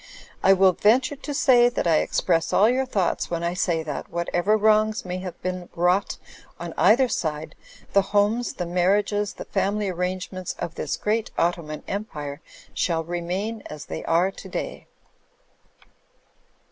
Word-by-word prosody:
I 195 - +6
will 190 0 +5
venture 250 - +2
to 285 +1 -7
say 245 -3 +5
that 245 - -2
I 165 -2 +4
express 165 0 +1
all 210 - +5
your 260 +2 +1
thoughts, 195 -8 0
when 170 -1 -2
I 170 +1 0
say 170 -3 0
that, 150 -2 -5
whatever 175 +4 +1
wrongs 215 +1 +2
may 180 0 -4
have 185 -1 -7
been 185 -1 -3
vnrought 180 +3 +1 0.4
on 170 -1 -6
either 235 +7 +5
side, 155 -8 -3 0.4
the 200 - +6
homes, 205 +5 +1
the 180 - -4
marriages, 200 +4 +1
the - - -8
family 205 0 -1
arrangements 185 0 -3
of 170 -2 -4
this 155 - -3
great 220 +1 -1
Ottoman 165 -3 -1
Empire, 150 -9 -5 0.3
shall 165 -2 0
remain 180 +6 -3
as 150 0 -8
they - - -6
are 175 +4 +2
to - - -11
day." - - -5
185 Hz, 155 wpm, -24 LUFS, 170-210 Hz, 0.4 s, I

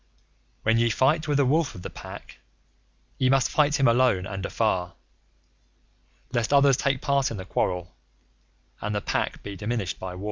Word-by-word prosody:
When 115 +1 +3
ye 115 0 +3
fight 150 +8 +2
with 145 -1 +1
a 140 - +4
Wolf 155 +3 +1
of 90 - -10
the - - -5
Pack, - - -10 0.8
ye 130 - +3
must 135 -1 +3
fight 150 -1 +2
him 135 - +4
alone 115 -6 +3
and 95 -2 -5
afar, 95 -4 -1 1.4
Lest 120 +1 0
others 140 -1 +5
take 135 -1 0
part 140 -1 +1
in 115 - -5
the 95 - -7
quarrel, 90 -1 -2 0.9
and 105 +1 -2
the 105 - -1
Pack - - -2
be 100 -1 -6
diminished 105 -2 -3
by 95 -1 -6
war. - - -9
115 Hz, 175 wpm, -25 LUFS, 95-140 Hz, 1.4 s, others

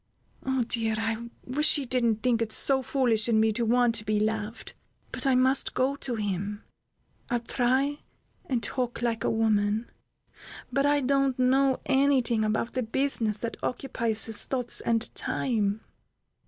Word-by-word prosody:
"Oh, 265 -2 0
dear! 225 -2 0
I 225 +1 -3 0.2
wish 295 +5 +3
he 285 -3 -2
didn't 235 -3 0
think 240 -2 +1
it 225 -1 -2
so 265 +4 +3
foolish 240 -4 +1
in 220 -2 +3
me 220 0 +3
to 235 +3 -2
want 240 +1 +2
to 215 - 0
be 210 0 0
loved! 215 +1 -3 0.4
But - - -2
I 265 - +3
must 260 +2 +3
go 265 +2 +1
to 255 -3 -4
him. 205 0 -4 0.7
I'll 240 -1 -1
try 260 +4 0 0.5
and 245 -3 -1
talk 245 -2 -3
like 230 -3 -1
a - - +1
woman, 220 0 0 0.8
but 275 +1 +2
I 290 0 +2
don't 275 0 +1
know 260 +1 +2
any 275 -1 +3
thing 230 -2 0
about 220 +2 -1
the 255 - -1
business 230 -3 0
that 230 +2 -5
occupies 235 -4 -1
his 225 -2 -1
thoughts 250 -3 -1
and 230 0 +2
time. 215 -4 -1
235 Hz, 165 wpm, -27 LUFS, 220-265 Hz, 0.8 s, wish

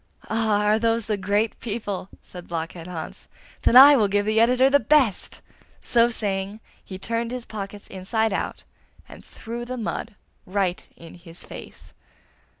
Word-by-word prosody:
'Ah! 220 -2 +1
are 210 +1 +3
those 230 0 +1
the 215 -1 0
great 205 +3 -1
people?' 205 -4 -4
said 180 -1 -11
Blockhead 165 0 -5
Hans. 165 -3 -8 0.3
'Then - - +2
I 280 +3 +11
will 215 -6 +3
give 205 +1 0
the 215 +1 +2
editor 250 +3 +5
the 285 +1 +4
best!' 255 -4 +2 0.4
So 235 0 +3
saying, 200 -2 -3 0.2
he 190 - -8
turned 230 +4 -2
his 250 -1 -5
pockets 205 -1 -7
inside 210 +3 -1
out, - - -3 0.4
and - - -13
threw 235 +1 -8
the 255 +1 -5
mud 225 -1 -4 0.3
right 185 -1 -1
in 165 -1 -12
his 170 -1 -9
face. - - -11
215 Hz, 155 wpm, -24 LUFS, 195-230 Hz, 0.4 s, I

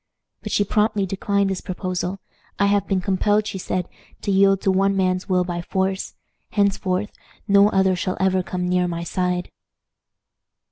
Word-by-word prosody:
But - - -6
she 205 - +3
promptly 210 0 +1
declined 200 +1 0
this 190 - -3
proposal. 185 0 -4 0.4
"I 200 - +3
have 200 -1 +2
been 190 -2 0
compelled," 205 +2 +1
she 195 - -4
said, 180 -1 -2 0.4
"to 200 - 0
yield 195 0 +4
to 195 - +2
one 195 +1 +2
man's 185 +1 0
will 180 -1 +3
by 175 -1 -4
force; 190 +2 -2 0.3
henceforth 200 -1 0 0.4
no 200 0 +6
other 190 -2 +2
shall 185 +1 -2
ever 190 0 +2
come 180 0 -3
near 180 0 +1
my 170 -1 -3
side." 180 0 -2
190 Hz, 160 wpm, -22 LUFS, 180-200 Hz, 0.4 s, no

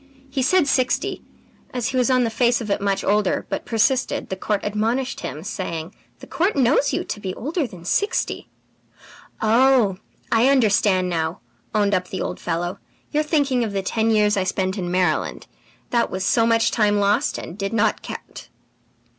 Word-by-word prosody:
He 270 -1 -1
said 330 +4 +3
sixty. 255 -2 0 0.5
As 245 -1 -1
he - - -4
was 255 0 +2
on 255 -1 +3
the 230 - -1
face 240 +1 +2
of 215 -4 -4
it - - 0
much 195 -1 0
older, 205 -1 +1
but - - -4
persisted, 245 +3 +1
the 190 - -2
court 205 +1 -1
admonished 225 +6 -1
him, 155 - -6
saying: 180 -4 -5 0.2
"'The - - -12
court 365 +5 0
knows 275 +1 +3
you - - -1
to - - -5
be 190 -2 -5
older 300 +3 -2
than 175 -6 -13
sixty!' 410 - -1 0.9
"'Oh, 230 -3 +4 0.3
I 230 +3 +4
understand 205 -7 +3
now,' 165 -1 -2 0.3
owned 205 -1 +2
up 185 -1 0
the 190 - -5
old - - -4
fellow. 175 +2 -3 0.3
'You 300 - +1
are - - +2
thinking 285 -5 +1
of 215 -3 -3
the 195 -1 -1
ten 220 +3 0
years 210 -2 +3
I 190 - +2
spent 190 0 -1
in 180 -4 -3
Maryland; 180 0 0 0.5
that 235 -1 +2
was 190 0 -3
so 230 +3 +3
much 230 0 +3
time 210 -2 +2
lost 205 +1 +1
and 170 - -7
did 195 -1 -3
not 225 -1 +1
count!'" - - -9
215 Hz, 185 wpm, -22 LUFS, 190-250 Hz, 0.9 s, Oh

